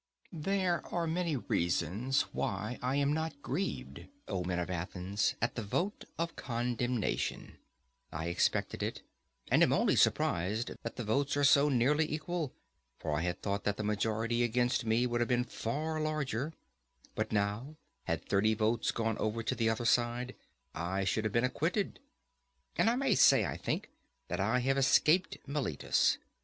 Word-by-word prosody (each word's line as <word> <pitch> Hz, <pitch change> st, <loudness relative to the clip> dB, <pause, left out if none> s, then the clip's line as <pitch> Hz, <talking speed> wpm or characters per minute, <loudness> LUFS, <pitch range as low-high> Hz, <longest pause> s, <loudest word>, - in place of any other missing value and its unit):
There 180 Hz, +2 st, 0 dB
are 170 Hz, -1 st, -1 dB
many 165 Hz, -1 st, 0 dB
reasons 100 Hz, -, 0 dB
why 105 Hz, +5 st, -2 dB
I 130 Hz, +2 st, 0 dB
am 140 Hz, +1 st, +2 dB
not 160 Hz, -2 st, -2 dB
grieved, 195 Hz, +1 st, -3 dB, 0.2 s
O 90 Hz, -, -2 dB
men 90 Hz, 0 st, -2 dB
of 90 Hz, +1 st, -2 dB
Athens, 90 Hz, +3 st, -1 dB
at 115 Hz, -, +1 dB
the 115 Hz, -, -3 dB
vote 175 Hz, -, -2 dB
of 170 Hz, 0 st, -2 dB
condemnation. 120 Hz, -1 st, -2 dB, 0.5 s
I 80 Hz, +2 st, -4 dB
expected 85 Hz, -, 0 dB
it, -, -, -3 dB, 0.5 s
and -, -, +5 dB
am -, -, +5 dB
only -, -, +3 dB
surprised 100 Hz, +7 st, +2 dB
that 115 Hz, -, -5 dB
the 120 Hz, -, -4 dB
votes 135 Hz, +6 st, 0 dB
are 145 Hz, -, +2 dB
so 145 Hz, +1 st, +6 dB
nearly 145 Hz, +5 st, +2 dB
equal; 160 Hz, -1 st, -2 dB, 0.5 s
for -, -, -4 dB
I 75 Hz, -, 0 dB
had 90 Hz, +1 st, -3 dB
thought 100 Hz, 0 st, -1 dB
that 105 Hz, -1 st, 0 dB
the 110 Hz, -, -3 dB
majority 110 Hz, +3 st, 0 dB
against 120 Hz, +1 st, +1 dB
me 115 Hz, +3 st, +3 dB
would 120 Hz, -1 st, 0 dB
have 120 Hz, -, +2 dB
been 125 Hz, -1 st, +3 dB
far 155 Hz, +7 st, -3 dB
larger; 150 Hz, -3 st, -1 dB, 0.6 s
but 110 Hz, 0 st, -2 dB
now, 105 Hz, +8 st, -1 dB, 0.3 s
had -, -, -2 dB
thirty 110 Hz, +2 st, +3 dB
votes 110 Hz, +1 st, +1 dB
gone 115 Hz, -1 st, -1 dB
over 110 Hz, +1 st, -1 dB
to -, -, 0 dB
the 115 Hz, -1 st, +1 dB
other 110 Hz, +1 st, -1 dB
side, 120 Hz, +1 st, +1 dB, 0.4 s
I 95 Hz, +4 st, -2 dB
should 110 Hz, +3 st, 0 dB
have 110 Hz, -, -1 dB
been 115 Hz, -, +3 dB
acquitted. 165 Hz, +10 st, -1 dB, 0.8 s
And 225 Hz, -, +4 dB
I 235 Hz, -, +2 dB
may 265 Hz, -3 st, +2 dB
say, -, -, +6 dB
I -, -, -3 dB
think, -, -, -3 dB, 0.4 s
that -, -, -2 dB
I 110 Hz, +6 st, +2 dB
have 135 Hz, +2 st, +2 dB
escaped 160 Hz, +6 st, +4 dB
Meletus. 140 Hz, -, +1 dB
120 Hz, 165 wpm, -32 LUFS, 105-145 Hz, 0.8 s, so